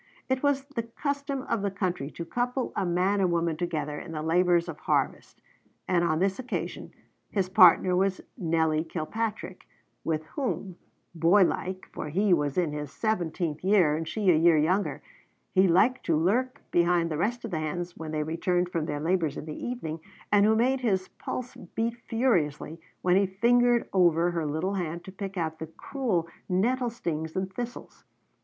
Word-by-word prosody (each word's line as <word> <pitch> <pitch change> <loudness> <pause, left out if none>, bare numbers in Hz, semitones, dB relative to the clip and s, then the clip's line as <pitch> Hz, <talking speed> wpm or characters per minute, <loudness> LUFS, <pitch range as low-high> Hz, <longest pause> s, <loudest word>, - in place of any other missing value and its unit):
It 260 0 +1
was 280 -1 +1
the 280 -4 -4
custom 280 +3 -3
of 225 - -1
the 200 - 0
country 185 -7 -2
to 170 - -7
couple 245 +6 -2
a 195 - 0
man 185 +4 +1
and 185 -2 +2
woman 170 -1 +1
together 155 -3 -3
in 165 - -8
the 155 -1 -3
labors 175 +1 +3
of - - -7
harvest; - - -1 0.5
and 175 -2 +2
on 160 -2 +1
this 190 +4 0
occasion 255 0 -4 0.4
his 190 -3 -1
partner 185 0 +6
was 190 +1 +1 0.2
Nelly 160 -5 +1
Kilpatrick, 185 +4 -4 0.4
with 155 -1 -1
whom, 220 - -3 0.4
boy 170 +4 +5
like, 185 +1 -2
for - - -5
he 195 +5 +2
was 145 -3 0
in 175 -4 +1
his 150 -1 -5
seventeenth 175 -7 -2
year 185 -6 +4
and 160 +1 -3
she 190 +3 +2
a - - +4
year 165 0 +5
younger, 180 +7 +1 0.5
he 190 0 +5
liked 210 +9 +3
to 165 -3 +3
lurk 235 +11 0
behind 170 -1 +2
the 155 - -1
rest 235 +5 -1
of 225 - -6
the 160 - -1
hands 170 +3 -4
when 160 -1 -7
they 155 -1 -1
returned 175 +3 0
from 165 -3 -1
their 145 -1 -2
labors 160 -2 0
in - - -6
the 155 - -6
evening, 165 -11 -4 0.3
and 205 0 +5
who 220 - +4
made 255 +4 +2
his 195 -7 0
pulse 250 0 -6 0.2
beat 230 +1 0
furiously 165 - 0 0.2
when 180 0 +4
he 195 0 +3
fingered 240 +5 +3
over 175 -2 +4
her 165 -3 -2
little 160 +7 -1
hand 170 -3 -3
to 190 - -8
pick 195 0 -6
out 160 -2 -2
the 160 - -5
cruel 185 - -2 0.2
nettle 240 +7 +1
stings 160 -8 -4
and 190 0 -2
thistles. 240 +4 -7
180 Hz, 180 wpm, -27 LUFS, 160-215 Hz, 0.5 s, partner